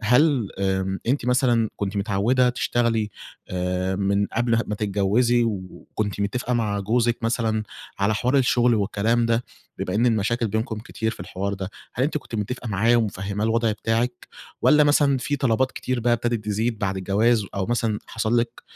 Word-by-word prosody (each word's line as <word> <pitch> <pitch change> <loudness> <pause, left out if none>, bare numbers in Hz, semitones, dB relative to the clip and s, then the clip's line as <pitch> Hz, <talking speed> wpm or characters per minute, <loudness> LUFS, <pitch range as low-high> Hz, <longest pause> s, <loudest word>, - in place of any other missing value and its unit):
هل 125 0 +3
آآ 95 0 0
أنتِ 125 0 0
مثلًا 120 -3 +2
كنتِ 100 0 -3
متعودة 110 +6 +2
تشتغلي 115 -3 0 0.4
آآ 90 +1 -1
من 100 0 +1
قبل 120 0 -1
ما 105 - -2
تتجوزي، 105 +4 +2
و 115 - +1 0.4
وكنتِ 105 -1 -3
متفقة 125 +5 -1
مع 105 -4 0
جوزِك 115 +3 +1
مثلًا 115 -2 0 0.4
على 100 +2 +2
حوار 125 +5 +1
الشغل 125 -2 +3
والكلام 110 +3 +1
ده، 115 +1 +1 0.3
بما 90 - -3
إن 120 +3 +3
المشاكل 115 +1 +1
بينكم 110 +1 -2
كتير 110 0 -3
في - - -10
الحوار 100 +3 -3
ده، 95 0 -5 0.2
هل 130 - +1
أنتِ 150 +1 0
كنتِ 120 - -11
متفقة 115 +3 -3
معاه 110 +4 +3
ومفهماه 100 -1 -1
الوضع 115 0 +2
بتاعِك، 115 +3 -2 0.3
والّا 150 0 +6
مثلًا 145 -2 +3
في 145 +3 -2
طلبات 130 -1 +1
كتير 130 -1 -2
بقى 120 +1 +2
ابتدت 120 -2 -1
تزيد 110 +2 -1
بعد 95 -1 -1
الجواز، 105 +3 +2
أو 95 -1 -1
مثلًا 115 -3 0
حصل 115 +1 0
لِك 120 - -5
115 Hz, 170 wpm, -23 LUFS, 100-120 Hz, 0.4 s, والّا